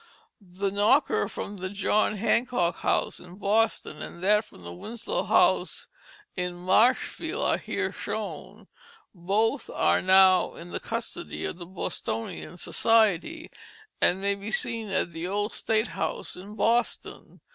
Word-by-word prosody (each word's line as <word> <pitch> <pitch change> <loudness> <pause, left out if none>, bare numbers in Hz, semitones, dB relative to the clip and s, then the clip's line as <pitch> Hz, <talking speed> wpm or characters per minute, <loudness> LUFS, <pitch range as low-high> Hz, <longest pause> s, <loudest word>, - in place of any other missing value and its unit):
The 195 +1 -3
knocker 210 +9 +3
from 205 - -6
the 185 0 -4
John 205 +2 +1
Hancock 230 -4 +1
House - - 0
in 180 0 -13
Boston 210 -5 0
and 170 - -8
that 210 +2 +4
from 90 - -16
the 85 0 -8
Winslow 235 - -4
House - - +2 0.5
in 180 -1 -2
Marshfield 190 +8 +2
are - - +2
here - - -2
shown; - - -6 0.5
both 210 +8 0
are - - +2
now 190 0 +5
in 175 +1 -10
the - - -3
custody 235 +10 -5
of 175 - -5
the 175 - -8
Bostonian 185 0 -5
Society, 225 - +1 0.5
and 180 - +4
may 200 0 +1
be 200 +2 -6
seen 225 -1 -1
at 180 -3 -1
the 165 +2 -4
Old 205 +3 -1
State 220 +1 0
House - - -3
in 200 +4 -10
Boston. 230 +2 -1
200 Hz, 140 wpm, -27 LUFS, 180-225 Hz, 0.5 s, now